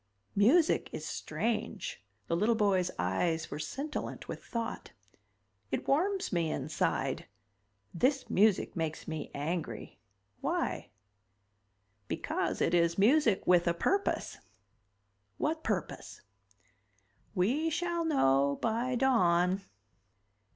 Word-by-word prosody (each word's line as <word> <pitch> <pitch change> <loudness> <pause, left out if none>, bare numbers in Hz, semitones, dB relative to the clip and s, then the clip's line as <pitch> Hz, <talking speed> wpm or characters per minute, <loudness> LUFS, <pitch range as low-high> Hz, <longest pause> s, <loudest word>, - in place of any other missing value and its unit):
"Music 270 - +4
is - - -5
strange." 220 - -3 0.2
The 165 - 0
little 215 +6 +2
boy's 195 -4 +2
eyes 160 - 0
were - - -4
scintillant 280 - -5
with - - -6
thought. 230 0 -5 0.8
"It - - -3
warms 370 - +1
me 170 -2 +1
inside. 150 +3 -1 0.7
This 265 - +1
music 205 0 +3
makes 160 -2 -3
me 155 -2 -4
angry. 145 -5 -4 0.4
Why?" - - -2 1.2
"Because - - -2
it - - +2
is 170 -1 +3
music 225 0 +4
with 175 -1 +4
a 170 - +2
purpose." 395 - 0 1.0
"What 315 +1 -1
purpose?" 195 -7 -3 1.1
"We 255 - +2
shall 340 +1 -1
know 140 - +3
by 235 +3 0
dawn. 185 -7 +3
200 Hz, 100 wpm, -31 LUFS, 170-265 Hz, 1.2 s, Music